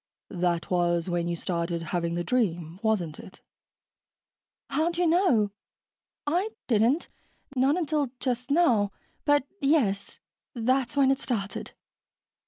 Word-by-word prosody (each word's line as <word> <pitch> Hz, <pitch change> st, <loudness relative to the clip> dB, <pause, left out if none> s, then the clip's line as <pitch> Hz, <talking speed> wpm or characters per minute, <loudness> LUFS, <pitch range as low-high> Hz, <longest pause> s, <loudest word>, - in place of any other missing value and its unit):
"That 175 Hz, -2 st, -1 dB
was 175 Hz, -1 st, +1 dB
when 170 Hz, -1 st, 0 dB
you 170 Hz, -, -1 dB
started 170 Hz, -1 st, -2 dB
having 170 Hz, -1 st, 0 dB
the 175 Hz, -, -1 dB
dream, 175 Hz, -8 st, -1 dB
wasn't 195 Hz, -9 st, 0 dB
it?" 185 Hz, -, -13 dB, 1.3 s
"How'd 335 Hz, +2 st, 0 dB
you 355 Hz, -, +2 dB
know? 320 Hz, -, +3 dB, 0.7 s
I 355 Hz, +8 st, +1 dB, 0.2 s
didn't 235 Hz, +7 st, +2 dB, 0.5 s
not 270 Hz, +5 st, +3 dB
until 305 Hz, -5 st, 0 dB
just 250 Hz, 0 st, -2 dB
now. 245 Hz, -, +3 dB, 0.3 s
But, 290 Hz, -2 st, +4 dB
yes, 270 Hz, -, +1 dB, 0.4 s
that's 255 Hz, +4 st, +1 dB
when 270 Hz, -1 st, +5 dB
it 270 Hz, -, +1 dB
started. 205 Hz, -6 st, -3 dB
230 Hz, 120 wpm, -27 LUFS, 175-285 Hz, 1.3 s, when